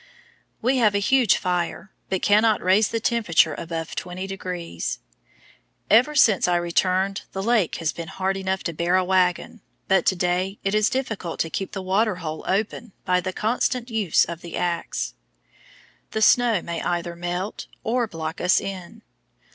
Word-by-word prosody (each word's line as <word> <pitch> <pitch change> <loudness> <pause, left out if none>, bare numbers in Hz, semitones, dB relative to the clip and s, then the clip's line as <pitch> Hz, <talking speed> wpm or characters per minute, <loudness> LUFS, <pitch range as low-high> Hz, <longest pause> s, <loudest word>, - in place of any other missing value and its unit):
We 260 +3 +2
have 215 -4 +3
a - - +4
huge 240 +2 +3
fire, 180 +2 -2 0.2
but 190 -1 -2
cannot 215 +1 +4
raise 195 +3 +4
the 230 - -2
temperature 220 -7 +2
above 165 -1 -5
20 180 +1 -5
degrees. 180 - -4 0.9
Ever 250 +8 +5
since 215 -10 +5
I 180 - +2
returned 185 +3 +1
the 195 - -3
lake 220 -6 +2
has 165 -2 -1
been 170 -1 -7
hard 190 +2 -2
enough 190 0 -2
to 170 - -3
bear 170 +3 +1
a 185 - +3
wagon, 185 +3 +1 0.3
but 190 -1 +2
to 190 - +4
day 180 +2 -1
it 195 - 0
is 215 0 +3
difficult 225 -10 -3
to 165 - -2
keep 195 - -4
the 190 -2 -4
water 200 +2 +1
hole 160 -3 -6
open 210 +2 -2
by 180 -1 +2
the 185 +1 -3
constant 240 +4 -1
use 210 -7 +3
of 170 0 -7
the 170 - -7
axe. 175 -1 -2 1.0
The 220 - -1
snow 235 -6 +4
may 170 -1 -4
either 175 -1 -2
melt 175 +4 -4 0.2
or 240 +1 0
block 165 -3 -5
us 180 +1 +4
in. 195 +3 -7
190 Hz, 170 wpm, -23 LUFS, 175-215 Hz, 1.0 s, Ever